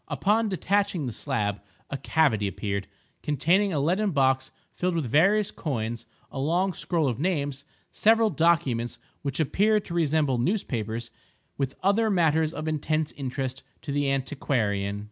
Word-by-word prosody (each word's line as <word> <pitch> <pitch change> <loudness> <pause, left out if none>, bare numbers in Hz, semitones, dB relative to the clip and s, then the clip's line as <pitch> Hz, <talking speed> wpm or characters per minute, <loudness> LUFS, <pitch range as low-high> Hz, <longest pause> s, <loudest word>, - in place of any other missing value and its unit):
Upon 215 +2 +1
detaching 195 -4 0
the 125 - -3
slab, 105 -2 -2 0.3
a - - -2
cavity 135 -9 +2
appeared, 100 0 -3 0.3
containing 175 +8 +2
a 155 - 0
leaden 185 +9 +1
box 135 -4 +2 0.2
filled 180 -1 -1
with 160 -4 0
various 195 - +3
coins, 115 -5 -4 0.2
a 135 - -5
long 175 +7 +1
scroll 165 -2 0
of 120 -2 -2
names, 145 -5 -1 0.3
several 225 0 +4
documents 155 -8 +1 0.2
which 140 0 -3
appear 210 +8 +3
to 170 - -8
resemble 155 -6 +1
newspapers, 120 - -2 0.4
with 135 -1 -2
other 210 +3 +3
matters 160 -4 +2
of 155 -1 -5
intense 155 0 -1
interest 130 -1 -4 0.2
to 145 - -4
the 145 0 +1
antiquarian! 110 -7 -1
150 Hz, 145 wpm, -26 LUFS, 130-180 Hz, 0.4 s, several